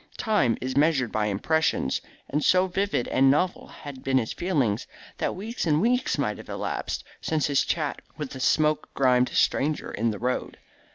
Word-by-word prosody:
Time 140 - +2
is 130 0 -4
measured 140 -5 +2
by 105 -1 0
impressions, 105 - 0 0.3
and 150 +2 -1
so 185 0 +4
vivid 190 -7 -1
and 135 0 +4
novel 175 +7 +1
had 140 -3 -10
been 135 0 +2
his 115 -4 0
feelings, 140 - 0 0.3
that - - -1
weeks 215 +1 -4
and 150 -1 +3
weeks 245 +6 +1
might - - -1
have - - -11
elapsed - - -3 0.2
since 155 -2 0
his 140 -2 +2
chat 150 -4 -2 0.2
with 150 -3 -5
the 130 - -7
smoke 155 +3 +2
grimed 125 -2 +3
stranger 150 +2 +1
in 115 +2 0
the 105 - -3
road. 125 +3 -2
145 Hz, 175 wpm, -26 LUFS, 125-165 Hz, 0.3 s, so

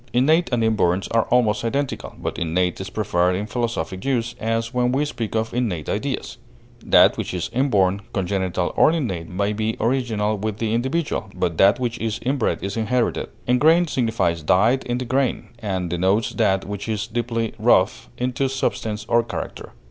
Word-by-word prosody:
Innate 155 +8 +3
and 120 -2 +1
inborn 95 -4 +2
are 115 -1 +2
almost 110 -4 +2
identical, 140 +4 -2
but - - -4
innate 90 +2 0
is 95 - -5
preferred 90 -4 +1
in 100 +3 -2
philosophic 115 -5 -3
use, 120 -3 0
as 115 +1 -1
when 125 0 +1
we 140 +3 +1
speak 115 -7 -4
of 110 0 -1
innate 105 -11 -2
ideas; - - -3 0.5
that - - +5
which - - -3
is 90 - -3
inborn, 100 -7 +2
congenital, 95 -2 -1
or - - +5
innate 95 - -2
may 100 +3 -1
be 110 +1 -2
original 110 -4 0
with 105 0 -3
the 110 -1 -1
individual, 130 0 -1
but 85 -3 -2
that 100 +5 +5
which 120 -2 -2
is 110 -1 -2
inbred 130 -1 0
is 100 +3 -3
inherited. 115 +2 0 0.2
Ingrained 160 +7 +4
signifies 110 -9 0
dyed 105 - +3
in 120 0 -1
the 130 - -3
grain, 130 +1 0
and 95 -6 -3
denotes 95 +5 +1
that 95 -4 +1
which 100 +2 -5
is 110 -2 -1
deeply 115 0 -2
wrought - - +4 0.2
into 125 +2 -1
substance 110 -5 -2
or 120 - +4
character. 115 -1 -7
115 Hz, 170 wpm, -22 LUFS, 95-125 Hz, 0.5 s, that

